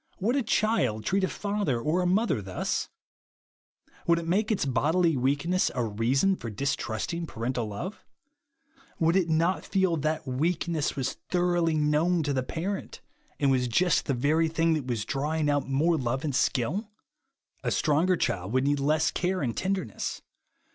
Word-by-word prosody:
Would 225 +7 +1
a 280 - +2
child 210 - +1
treat 195 +1 +1
a - - +3
father 200 - -1
or 155 +9 0
a 180 - +1
mother 190 - +2
thus? 95 -1 -2 1.2
Would 170 0 +5
it 170 - -3
make 205 +6 +1
its 205 - +1
bodily 160 +6 +2
weakness 145 +8 +1
a 125 - 0
reason 120 - +1
for 115 - -6
distrusting 140 - -2
parental 120 -2 -3
love? 140 - -6 0.9
Would 165 +1 +2
it 180 -3 +2
not 165 +4 +1
feel 190 -4 +1
that 155 +1 -1
that - - -18
weak 160 +7 0
ness 160 -4 -1
was 135 -2 -2
thoroughly 175 -2 +2
known 155 +3 +2
to 145 -1 -1
the 130 - +1
parent, 175 +9 -4 0.4
and 140 -2 +3
was 125 -1 +2
j 120 +10 +2
ust 175 - +1
the 140 - +1
very 155 +6 +2
thing 165 +1 +1
that 150 -5 -2
was 115 -4 -2
draw 145 +3 -2
ing 150 -2 +1
out 145 -1 -1
more 160 +5 +2
love 130 +2 -2
and 150 -3 -1
skill? 150 - 0 0.7
A - - 0
stronger 165 +4 +2
child 90 - -2
would 130 0 +2
need 145 +1 +1
less 155 +3 +2
care 180 -2 -1
and 115 -3 -1
tenderness. 185 - -3
155 Hz, 175 wpm, -27 LUFS, 130-180 Hz, 1.2 s, Would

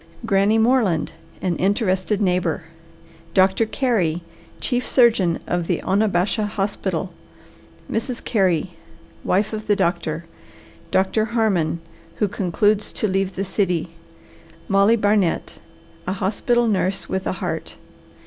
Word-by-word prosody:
GRANNY 200 +3 +3
MORELAND, 220 -8 +2 0.3
An 180 -2 +1
Interested 200 +1 +1
Neighbour. 180 -3 0 0.7
DR. 190 0 +6 0.2
CAREY, 190 - 0 0.4
Chief 245 -1 -1
Surgeon 220 -9 +3
of 175 -1 -1
the - - 0
Onabasha 200 +1 +1
Hospital. 195 -3 -2 0.7
MRS. 235 +2 -3
CAREY, 185 -5 +1 0.5
Wife 205 +4 +1
of 215 0 -5
the 205 - +4
Doctor. 170 -4 -1 0.6
DR. 195 +3 +2
HARMON, 200 -8 0 0.3
Who 210 - +1
Concludes 205 +2 +1
to 215 - -1
Leave 195 0 -1
the 195 - -2
City. 180 -4 -1 0.8
MOLLY 200 +3 +4
BARNET, 205 -5 +1 0.5
A 185 - 0
Hospital 230 +5 +1
Nurse 195 -2 0
with 190 0 -2
a - - 0
Heart. - - -4
195 Hz, 115 wpm, -22 LUFS, 180-215 Hz, 0.8 s, DR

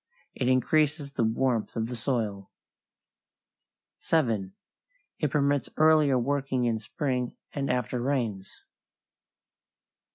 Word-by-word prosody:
It 125 - -2
increases 145 +3 +2
the 120 - -1
warmth 115 0 0
of 115 -1 0
the 120 +2 -5
soil. 110 -5 -2 1.5
7. 110 -12 0 0.7
It 150 - +1
permits 140 -1 +1
earlier 155 -3 +5
working 135 0 0
in 115 -2 0
spring 125 +2 -3 0.2
and 140 -1 -2
after 125 0 -1
rains. 120 -8 -2
130 Hz, 100 wpm, -28 LUFS, 115-140 Hz, 1.5 s, earlier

